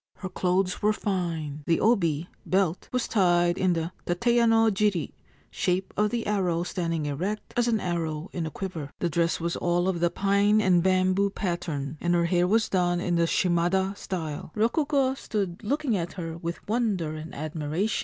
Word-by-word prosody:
Her 185 - -6
clothes 180 0 0
were 210 +1 +3
fine. 165 -8 -3
The 165 - +3
obi 170 -8 +2 0.2
(belt) 185 -2 0
was 250 -1 -1
tied 175 -4 +3
in 185 -1 +3
the 165 0 -2 0.2
tateyanojiri 220 - +2 0.4
(shape 185 +1 -1
of 210 0 +2
the 235 0 -2
arrow 180 -5 0
standing 165 -4 -2
erect, 180 +9 -3
as 240 0 +2
an 225 -2 +2
arrow 165 -3 -2
in 170 -3 -2
a - - -3
quiver). 160 -3 -5
The 175 - -1
dress 170 +1 +1
was 170 0 -2
all 175 +1 +1
of 185 -3 0
the 175 0 +2
pine 200 +3 +3
and 185 -4 +4
bamboo 185 +2 +2
pattern, 160 -7 -3
and 175 0 +2
her 170 0 +2
hair 175 +1 +2
was 220 +3 +3
done 175 -2 +1
in 175 -1 0
the 170 0 +3
shimada 180 +3 +1
style. 160 -6 -5
Rokugo 270 +4 +2
stood 200 -9 -3
looking 275 +1 0
at 170 -2 -3
her 165 -3 -5
with 170 +1 -6
wonder 205 -8 0
and 155 +1 -8
admiration. 155 +6 -2
180 Hz, 175 wpm, -27 LUFS, 170-205 Hz, 0.4 s, and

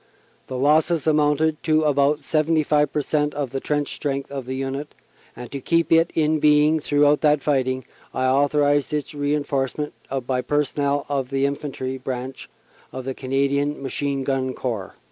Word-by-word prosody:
The 130 - -4
losses 155 +4 +2
amounted 155 0 +2
to 155 0 +2
about 145 0 +2
75 155 -2 +2
per 150 - 0
cent, 150 0 0
of 140 -4 -3
the 135 - -2
trench 145 +1 -1
strength 140 -1 -3
of 135 -3 -5
the 130 - -3
Unit, 135 +2 -4 0.4
and 125 0 -9
to 140 - -5
keep 165 +3 +1
it 165 +1 +5
in 155 -1 +2
being 150 +1 +4
throughout 145 0 +3
that 150 -2 +3
fighting, 130 -3 0 0.3
I 130 - -1
authorized 145 +2 +2
its 150 0 -3
reinforcement 145 0 -1 0.3
by 125 0 0
personnel 145 +1 0
of 135 -3 -2
the 135 0 +1
Infantry 135 -2 -3
branch 130 0 -6 0.4
of 130 -1 -7
the 135 - -2
Canadian 140 +2 0
Machine 140 0 -2
Gun 130 -1 -1
Corps." 110 -7 -4
145 Hz, 160 wpm, -23 LUFS, 135-150 Hz, 0.4 s, it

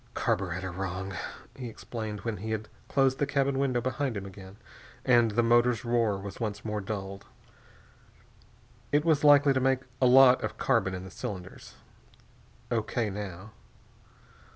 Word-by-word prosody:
"Carburetter 90 0 -1
wrong," 95 +1 -4 0.4
he 125 -3 -6
explained 110 -2 -6
when 115 -1 -3
he 110 +5 -6
had 110 -1 -3 0.2
closed 135 -1 +2
the 145 - +1
cabin 140 -1 +1
window 130 -3 +1
behind 130 -1 -2
him 100 - -5
again 95 0 -11 0.5
and 120 -2 +5
the 120 +3 +1
motors' 120 +1 +3
roar 115 -4 +1
was 100 +3 -8
once 110 -3 -4
more 105 -1 -2
dulled. 100 -1 -6 1.6
"It 145 +2 +2
was 155 -3 +3
likely 145 -1 +6
to 130 - +1
make 130 0 +2 0.2
a 130 - +6
lot 130 0 +7
of - - -4
carbon 95 0 +1
in 90 - -6
the 95 - -10
cylinders. 95 -6 -7 1.0
O.K., 115 -1 -1
now." 100 0 -7
110 Hz, 150 wpm, -29 LUFS, 100-130 Hz, 1.6 s, lot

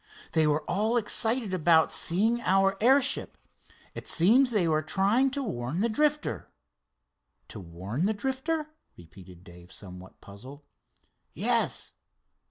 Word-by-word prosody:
They 160 -1 +2
were 150 +1 0
all 220 +5 0
excited 225 -1 0
about 165 -2 +3
seeing 220 +8 0
our 195 -1 +2
airship. 265 +3 +2 0.6
It - - -9
seems 235 +10 +4
they 205 -7 +1
were 155 -1 +1
trying 200 - +1
to 275 +1 -4
warn 150 - -4
the 230 - +1
Drifter." 295 +5 -1 1.0
"To - - -9
warn 95 - -4
the 220 - 0
Drifter?" 295 +7 -3 0.2
repeated 90 +1 -15
Dave 90 0 -15
somewhat 90 -1 -12
puzzled. 130 +9 -13 0.7
"Yes." - - -1
190 Hz, 125 wpm, -27 LUFS, -, 1.0 s, seems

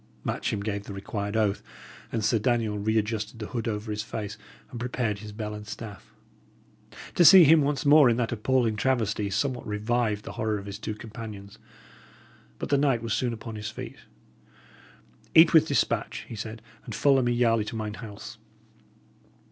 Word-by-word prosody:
Matcham 100 - -2
gave 100 -1 -3
the 100 - -7
required 100 +1 -4
oath; 105 -2 +1 0.5
and 110 -3 -1
Sir 115 +1 +2
Daniel 110 -2 0
re 110 +2 0
adjusted 110 0 -2
the 110 - -5
hood 115 -3 -3
over 105 0 -3
his 105 0 -2
face, 105 -2 -5 0.4
and 120 - -7
prepared 120 -3 -2
his 105 0 -9
bell 105 0 -5
and 105 0 -8
staff. 105 -2 -9 1.0
To 175 - +4
see 185 +2 +10
him 160 +1 +6
once 145 +2 -1
more 145 -2 +7
in 115 - +1
that 120 -2 -1
appalling 120 -1 +1
travesty 110 -4 0
somewhat 125 +5 -2
revived 105 0 -1
the - - -6
horror 110 -1 -1
of 100 - -8
his 100 0 -7
two 110 - -4
companions. 105 -3 -9 1.0
But - - -5
the 140 - +3
knight 135 -5 +1
was 115 -2 -1
soon 125 +3 0
upon 115 -1 -7
his 105 +1 -5
feet. - - -8 1.4
"Eat 160 +1 +8
with 160 -1 +6
despatch," 140 - -1
he 115 - -7
said, 110 +1 -7 0.2
"and 115 - -7
follow 135 -2 +4
me 120 -1 +1
yarely 115 -3 +2
to 110 - -5
mine 110 -1 -4
house." 105 -2 -9
110 Hz, 180 wpm, -27 LUFS, 105-120 Hz, 1.4 s, see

